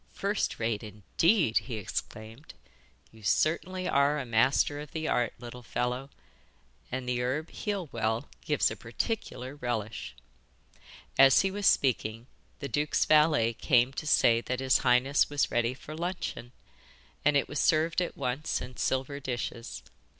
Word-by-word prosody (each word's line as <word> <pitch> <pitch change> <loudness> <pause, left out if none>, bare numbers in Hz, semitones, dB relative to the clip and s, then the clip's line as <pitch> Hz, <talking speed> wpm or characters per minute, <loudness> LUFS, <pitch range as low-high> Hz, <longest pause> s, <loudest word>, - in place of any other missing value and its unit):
'First 200 +1 -1
rate, 110 -2 -1
indeed!' 110 - +1
he 125 - -6
exclaimed. 110 +5 -6 0.6
'You 110 - -17
certainly 180 - 0
are 140 +2 +3
a 140 - -3
master 130 +5 +2
of 150 0 -9
the 160 -1 -3
art, 120 -2 0
little 120 +1 -9
fellow, 125 +3 -3 0.8
and 130 0 -4
the 125 -1 0
herb 140 +6 -2
heal 200 -5 -3
well 110 +2 -1 0.2
gives - - +1
a - - -4
particular 130 - -4
relish.' 110 - -4 1.0
As 135 -1 +8
he 195 - 0
was 205 0 0
speaking, 115 -3 +1 0.4
the 140 - -3
duke's 150 +4 +1
valet 150 -7 +4
came 125 +1 +2
to 150 - -5
say 115 -5 +4
that 125 +1 -3
his 130 -1 +3
highness 125 +3 +3
was 145 -1 0
ready 120 +1 +1
for 150 +3 -10
luncheon, 170 -8 -4 0.7
and 150 -1 +4
it 140 - 0
was 145 - -4
served 160 +2 +2
at 175 - -3
once 130 +5 -2
in 125 0 -9
silver 135 +2 -1
dishes. 120 -3 -5
130 Hz, 150 wpm, -29 LUFS, 120-150 Hz, 1.0 s, As